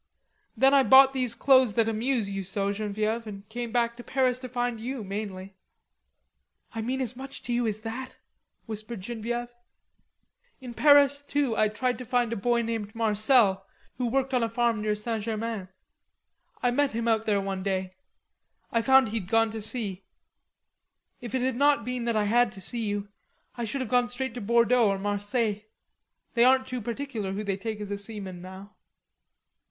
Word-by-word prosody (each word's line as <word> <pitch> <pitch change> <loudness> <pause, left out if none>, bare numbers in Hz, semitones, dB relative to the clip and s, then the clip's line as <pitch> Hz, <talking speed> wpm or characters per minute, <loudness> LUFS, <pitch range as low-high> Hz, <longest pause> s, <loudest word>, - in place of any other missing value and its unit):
Then 270 +1 +5
I 280 - +7
bought 265 0 +7
these 250 -3 0
clothes 260 -5 +4
that 225 +1 +2
amuse 225 0 0
you 195 0 -3
so, 195 +2 -1
Genevieve, 215 +2 -2
and 200 -1 -9
came 235 +1 -5
back 235 -1 +1
to 240 - -9
Paris 255 -1 +1
to 255 -1 -7
find 245 -1 -2
you, 245 +1 -4
mainly." 195 -1 -6 1.2
"I 225 - -3
mean 255 +4 -2
as 250 -1 -2
much 270 +2 -8
to 240 - -3
you 240 -1 +1
as 215 0 -3
that?" 245 +4 -6 0.5
whispered 215 -1 -7
Genevieve. 240 +3 -4 1.1
"In 250 -3 -8
Paris, 285 0 +5
too. 285 -4 -1
I 215 - +3
tried 245 +4 -2
to - - -5
find 240 -1 +1
a - - -2
boy 235 +3 +1
named 225 -1 -4
Marcel, 215 -3 +3 0.3
who 250 - 0
worked 265 +2 0
on 250 - +2
a 230 - 0
farm 230 -1 0
near 210 0 0
St. 220 0 -3
Germain. 220 -3 -3 1.0
I 245 - +3
met 280 +1 +1
him 230 +1 -2
out 225 -1 +1
there 205 -2 +2
one 195 -1 -3
day. 190 -1 -2 0.8
I 230 - +2
found 265 -1 +5
he'd 210 -4 -4
gone 225 0 +3
to 220 0 -5
sea.... 205 -4 -2 1.2
If 240 0 -6
it 255 - 0
had 260 -1 0
not 280 -4 +3
been 250 -1 -3
that 235 -1 0
I 215 - +2
had 235 +3 +3
to 195 - -10
see 230 +3 0
you, 205 0 -3 0.4
I 240 - -4
should 265 +5 -3
have 250 - -4
gone 245 -1 +3
straight 245 0 -3
to 245 - -6
Bordeaux 235 +1 +3
or 195 - 0
Marseilles. 205 +2 -1 0.7
They 235 - +4
aren't 260 +1 +5
too 255 -2 -5
particular 230 -4 -4
who 205 +2 -3
they 200 -2 -1
take 215 +2 -5
as 205 -1 -6
a 200 - -3
seaman 200 -4 -6
now." 190 +3 -11
230 Hz, 185 wpm, -27 LUFS, 210-250 Hz, 1.2 s, I